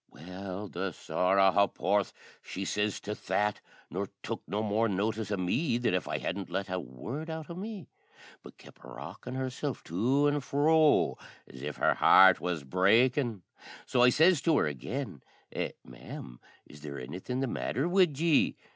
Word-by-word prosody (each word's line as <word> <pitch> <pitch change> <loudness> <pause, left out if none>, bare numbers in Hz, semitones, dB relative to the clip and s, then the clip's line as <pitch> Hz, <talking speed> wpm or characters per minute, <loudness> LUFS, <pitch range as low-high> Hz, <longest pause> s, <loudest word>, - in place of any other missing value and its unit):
Well, 95 +5 -7
the 95 0 -4
sorra 95 +4 +2
ha'porth 100 +1 +1 0.3
she 95 - -6
sez 105 +1 -1
to 105 - -4
that, 105 +2 0 0.3
nor - - -3
tuk - - -4
no 105 +6 -2
more 110 +2 +1
notice 105 +2 -1
o' 105 - -1
me 115 - 0
than 120 -6 0
if 90 -3 -1
I - - -1
hadn't 95 +1 -4
let 95 0 -3
a 95 - -1
word 120 - -7
out 160 0 -6
o' - - -4
me, 200 0 -7 0.5
but - - -14
kep' - - -17
rockin' - - -8
herself 130 +1 -3
to 130 - +1
an' 145 0 +1
fro, 150 +2 +3 0.3
as 65 - -13
if 75 0 -4
her - - +2
heart 95 0 +7
was 85 -5 -2
breakin'; 110 - +2 0.4
so 125 - +1
I 125 - +7
sez 160 +4 +4
to 160 -3 +3
her - - +3
again, 75 - -5 0.3
"Eh, - - -3
ma'am, - - -10 0.3
is 75 - -15
there 70 -2 -6
anythin' 90 - -5
the 135 - +1
matther 135 +3 -2
wid 175 -6 +3
ye?" 165 -2 +3
105 Hz, 170 wpm, -30 LUFS, 90-140 Hz, 0.5 s, heart